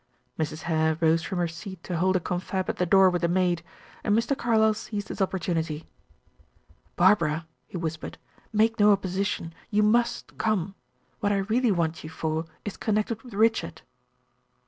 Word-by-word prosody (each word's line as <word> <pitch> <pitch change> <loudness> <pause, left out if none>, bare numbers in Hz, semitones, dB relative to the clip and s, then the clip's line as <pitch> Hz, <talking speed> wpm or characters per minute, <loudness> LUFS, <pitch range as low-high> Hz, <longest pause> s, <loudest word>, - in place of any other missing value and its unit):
Mrs. 155 0 -3
Hare 160 -1 +1
rose 165 0 +3
from 185 - -4
her 175 -1 +1
seat 175 +2 -9
to 180 - -4
hold 185 +3 +2
a - - +4
confab 185 +2 -2
at - - -13
the 180 - 0
door 190 +1 +6
with 175 - -1
the 170 - +2
maid; 175 -1 +1 0.4
and 210 +1 +3
Mr. 230 +5 +1
Carlyle 220 -3 +3
seized 210 -1 -5
his - - -5
opportunity. 165 -4 -1 1.1
"Barbara," 165 -5 +3 0.2
he - - -6
whispered, 160 -2 -4 0.3
"make 225 +1 +2
no 210 0 +7
opposition. 190 -3 -1 0.2
You 210 -1 +3
must 235 +2 +1
come. 200 -4 0 0.5
What 205 - +1
I 200 - +2
really 220 +4 +2
want 165 -3 -1
you 155 - -7
for 160 0 -2 0.2
is 205 - -5
connected 215 +1 -1
with 240 -4 -11
Richard." 225 +2 +1
190 Hz, 170 wpm, -26 LUFS, 165-215 Hz, 1.1 s, no